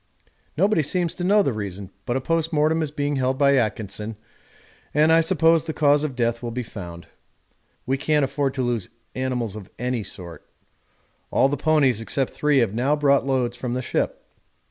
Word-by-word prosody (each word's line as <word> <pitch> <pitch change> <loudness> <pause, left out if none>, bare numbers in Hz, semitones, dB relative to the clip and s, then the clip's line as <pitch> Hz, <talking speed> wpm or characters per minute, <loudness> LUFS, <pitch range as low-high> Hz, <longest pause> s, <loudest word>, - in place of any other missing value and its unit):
Nobody 195 0 +3
seems 170 +3 0
to 180 - -5
know 205 +3 +4
the 135 - 0
reason, 100 -2 -6 0.2
but 120 - 0
a - - -3
post 165 +3 0
mortem 155 +1 +2
is 155 - -1
being 145 -1 -2
held 130 0 0
by 140 0 +4
Atkinson 110 -2 -2 0.8
and 155 +2 +5
I 165 - +6
suppose 165 -1 +3
the 160 - -4
cause 145 -1 +3
of 145 -4 -3
death 115 -1 0
will 120 - -4
be 125 +2 -3
found. 85 -7 -9 0.8
We 135 +1 0
can't 150 -1 +2
afford 135 0 -1
to 130 - -1
lose 120 -6 -1 0.2
animals 125 -5 -2
of 105 -3 -9
any 125 -1 -2
sort. 90 -4 -9 0.9
All 135 - +3
the 145 - 0
ponies 145 -6 +2
except 130 +3 -1
three 150 -1 +2
have 115 -6 +2
now 130 +6 +1
brought 140 -2 +2
loads 125 -3 0
from 120 0 -4
the 130 - -2
ship. - - -2
135 Hz, 190 wpm, -23 LUFS, 120-150 Hz, 0.9 s, I